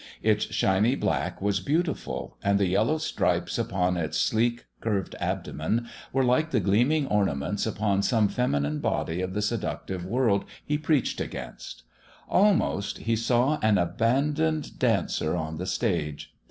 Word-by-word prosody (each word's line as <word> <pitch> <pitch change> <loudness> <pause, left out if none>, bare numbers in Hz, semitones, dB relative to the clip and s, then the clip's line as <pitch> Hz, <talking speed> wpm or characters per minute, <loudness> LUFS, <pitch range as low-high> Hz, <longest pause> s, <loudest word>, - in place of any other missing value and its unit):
Its 105 -1 +3
shiny 105 +7 +2
black 100 - -1
was 100 -1 +1
beautiful, 145 - -2
and 100 0 +3
the 100 - +2
yellow 110 - +2
stripes 155 - 0
upon 90 -1 0
its 80 -3 -2
sleek, 120 +2 +1
curved 100 -5 -2
abdomen 110 +10 -2 0.2
were 135 0 +2
like 130 +6 +2
the 125 - +2
gleaming 120 - +2
ornaments 100 - 0
upon 105 -2 0
some 110 0 +3
feminine 75 -11 0
body 85 +3 -1
of 95 +1 -3
the 105 - 0
seductive 100 -4 -3
world 110 0 +1 0.2
he 150 - 0
preached 150 -2 0
against. - - -7 0.4
Almost, 190 - +2
he 115 0 0
saw 120 +6 +2
an 110 -1 +4
abandoned 140 - 0
dancer 80 - +1
on 80 -2 -3
the 90 +3 -4
stage. 85 -12 -2
105 Hz, 140 wpm, -27 LUFS, 95-125 Hz, 0.4 s, an